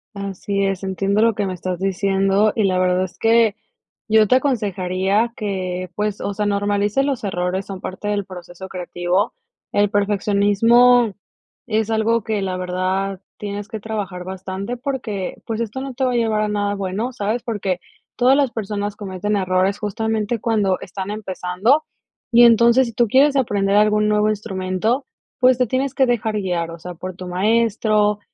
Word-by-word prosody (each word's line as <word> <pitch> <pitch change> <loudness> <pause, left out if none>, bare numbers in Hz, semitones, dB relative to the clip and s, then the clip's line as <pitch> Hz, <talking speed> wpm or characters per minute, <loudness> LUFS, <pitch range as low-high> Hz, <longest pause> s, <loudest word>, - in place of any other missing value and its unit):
Así 200 0 -2
es, 195 -1 -2
entiendo 195 +2 0
lo 230 0 +4
que 205 - -1
me 190 - -3
estás 180 0 -4
diciendo 195 +2 +2
y 220 - +1
la 185 -2 +2
verdad 185 0 +2
es 185 - -7
que 225 -2 +4 0.5
yo 220 -1 +5
te - - +5
aconsejaría 205 -4 0
que, 185 -3 -3
pues, 210 -1 -2
o 200 - -2
sea, 210 +1 -2
normalices 205 +4 +1
los 270 -6 -2
errores, 185 0 -2
son 195 -2 -7
parte 190 +2 -6
del 205 -1 0
proceso 180 0 -10
creativo. 180 +2 -1 0.4
El 205 0 +3
perfeccionismo 205 +3 +3 0.5
es 220 -1 0
algo 225 0 +1
que 215 -1 -1
la 190 -1 -2
verdad 185 +1 -2 0.2
tienes 205 0 -5
que 220 -1 -7
trabajar 200 -4 -4
bastante 190 +5 -5
porque, 240 -7 -4
pues 225 -1 -3
esto 235 +3 -3
no 270 -1 -5
te 265 - 0
va 255 - +1
a - - -1
llevar 220 -2 +1
a - - 0
nada 205 -1 -1
bueno, 200 +5 -3
¿sabes? 225 0 -2
Porque 200 -6 -2 0.4
todas 255 +2 +4
las 275 -4 +2
personas 205 -2 -3
cometen 205 0 -3
errores 190 +1 +1
justamente 220 +2 -1
cuando 205 -4 +1
están 190 +1 -6
empezando 205 +6 0 0.5
y 240 0 +7
entonces 235 +2 +6
si 230 - -7
tú 235 +2 +2
quieres 280 +4 +4
aprender 200 -6 +1
algún 210 0 +4
nuevo 210 0 +2
instrumento, 205 +4 -1 0.4
pues 255 0 +5
te 250 -1 +1
tienes 260 +3 -1
que 270 - +3
dejar 225 -3 0
guiar, 175 -5 -2
o 165 - -9
sea, 180 +2 -7
por 185 +2 -7
tu 185 - -7
maestro, 210 +2 +2
205 Hz, 170 wpm, -20 LUFS, 190-225 Hz, 0.5 s, y